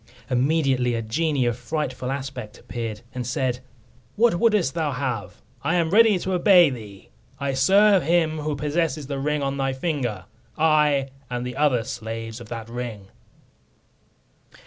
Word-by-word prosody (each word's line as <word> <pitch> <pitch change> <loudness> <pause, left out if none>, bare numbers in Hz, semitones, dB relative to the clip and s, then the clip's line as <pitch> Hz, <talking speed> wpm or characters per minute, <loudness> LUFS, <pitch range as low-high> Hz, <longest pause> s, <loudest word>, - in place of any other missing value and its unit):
Immediately 130 -2 +2
a 115 - -2
genie 140 +3 0
of 120 -1 +1
frightful 130 0 -3
aspect 130 -5 -6
appeared, 115 -3 -6
and 125 -2 -4
said, 130 -1 -1 0.6
"What 225 -5 +3
wouldst 210 - +3
thou 155 -4 -1
have? 130 -5 -4 0.2
I 165 - 0
am 165 -2 +1
ready 220 -1 +6
to 185 +1 -3
obey 180 -3 +6
thee. 105 -6 -10 0.3
I 140 -1 -1
serve 195 +8 +5
him 160 0 +1
who 150 0 -2
possesses 150 0 -1
the 140 0 -4
ring 150 +1 -1
on 135 0 -2
thy 135 -1 0
finger; 130 - -2 0.3
I, 150 -3 +3 0.2
and 125 0 -3
the 125 0 -5
other 135 -5 +2
slaves 115 0 -6
of - - -11
that 115 -2 -6
ring." 115 -5 -6
135 Hz, 150 wpm, -24 LUFS, 120-160 Hz, 0.6 s, ready